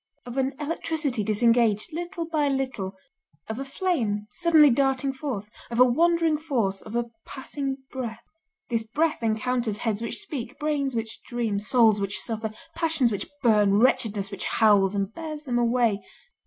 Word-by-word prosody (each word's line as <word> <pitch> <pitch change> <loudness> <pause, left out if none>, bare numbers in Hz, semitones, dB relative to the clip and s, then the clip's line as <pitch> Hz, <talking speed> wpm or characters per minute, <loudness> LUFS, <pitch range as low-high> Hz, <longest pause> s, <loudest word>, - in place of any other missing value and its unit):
Of 245 0 -7
an 265 +1 0
electricity 300 -5 -1
disengaged, 230 - +2
little 345 +1 -4
by 310 -3 0
little, 260 -9 -2 0.5
of 220 +2 -4
a - - -2
flame 270 - -1
suddenly 315 -1 +5
darting 270 +1 +1
forth, 260 -7 -4 0.2
of 235 0 -3
a 250 - +9
wandering 330 +4 +3
force, 235 -11 -1
of 220 +1 -8
a 235 -1 -1
passing 270 0 -4
breath. 235 -3 -5 0.5
This 230 -1 +1
breath 300 +9 0
encounters 225 0 0
heads 220 -2 -2
which 230 - -3
speak, 265 -6 -4
brains 285 -4 -1
which 225 -1 -3
dream, 230 -5 -2
souls 220 -1 +4
which 200 0 -2
suffer, 220 -2 -3 0.2
passions 315 -7 +1
which 200 - -3
burn, 210 -4 +4
wretchedness 215 -4 +2
which 200 - -5
howls, 205 -3 +4
and 200 +1 -1
bears 310 -2 -6
them 245 -4 0
away. 235 -3 +2
240 Hz, 155 wpm, -26 LUFS, 215-285 Hz, 0.5 s, a